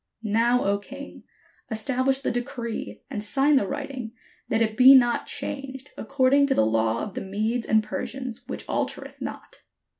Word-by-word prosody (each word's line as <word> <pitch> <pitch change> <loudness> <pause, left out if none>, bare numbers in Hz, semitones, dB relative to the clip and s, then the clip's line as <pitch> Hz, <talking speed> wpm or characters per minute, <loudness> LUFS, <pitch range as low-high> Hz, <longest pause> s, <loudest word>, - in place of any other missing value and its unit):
Now, 230 +3 +2
O 200 0 +1
king, 275 +7 -11 0.4
establish 260 +3 0
the - - -1
decree, 235 - -5
and 210 - -3
sign 275 +7 +3
the 235 -8 +2
writing, 270 -5 -5 0.4
that 225 - +1
it 220 -1 +1
be 260 +3 +9
not 240 -2 +3
changed, 270 0 -4
according 275 +3 +3
to 270 - +1
the - - +4
law 110 +1 +1
of 205 - -6
the - - -4
Medes 215 +5 -2
and 220 0 +3
Persians, 250 +2 -5
which - - -6
altereth - - -3
not." - - -7
240 Hz, 160 wpm, -25 LUFS, 215-270 Hz, 0.4 s, be